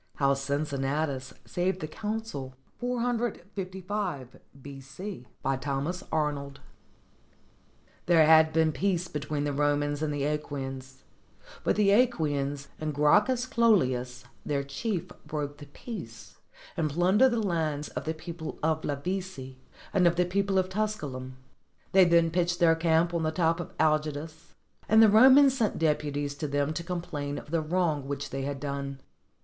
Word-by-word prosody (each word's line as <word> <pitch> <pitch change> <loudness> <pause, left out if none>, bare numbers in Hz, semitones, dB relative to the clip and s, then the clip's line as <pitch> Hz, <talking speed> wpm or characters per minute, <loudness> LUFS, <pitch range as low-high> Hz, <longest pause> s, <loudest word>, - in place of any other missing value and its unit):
HOW 140 -1 +3
CINCINNATUS 140 0 -2
SAVED 185 +1 -1
THE 155 - -4
CONSUL 210 -8 -5 0.3
USS 205 - -3 0.2
B.C.] 135 +3 -8 0.2
BY 135 - +1
THOMAS 145 +7 -3
ARNOLD 145 -3 -2 1.5
There 165 -3 +6
had 160 0 +6
been 160 0 +3
peace 175 +4 0
between 150 -1 -3
the 145 -1 -1
Romans 145 0 0
and 155 -1 0
the 145 -1 -2
iiEquians: 135 -3 -4 0.6
but - - +2
the 205 -1 +3
^quians 145 - +1
and 155 -1 -3
Gracchus 210 - +3
Cloelius, 130 - +2 0.2
their 140 -2 -1
chief, 180 +6 -3 0.2
broke 145 -1 -4
the 145 - -10
peace, 145 - -9 0.4
and 155 -2 0
plundered 185 - +4
the 235 - +1
lands 160 -7 -1
of - - -6
the 160 +1 -2
people 160 0 -7
of 160 0 +1
Lavici 145 -3 -4 0.4
and 185 -3 +4
of 170 - +3
the 180 +1 +2
people 195 +2 0
of 185 -1 +2
Tusculum. 150 -11 -3 0.5
They 190 -1 +7
then 170 -1 +4
pitched 175 0 0
their 165 -1 +5
camp 165 +1 +2
on 170 - 0
the 155 - +1
top 165 +1 +1
of 175 - -7
Algidus; 155 +1 -1 0.3
and 220 - +6
the 220 - +7
Romans 265 +5 +7
sent 225 -5 0
deputies 145 -2 0
to 150 - -3
them 145 +1 0
to 170 - -4
complain 165 -5 -4
of - - -9
the 165 -1 +1
wrong 155 -4 0
which 140 0 -4
they 135 - -3
had 140 0 -3
done. 140 -1 -4
155 Hz, 145 wpm, -28 LUFS, 140-185 Hz, 1.5 s, They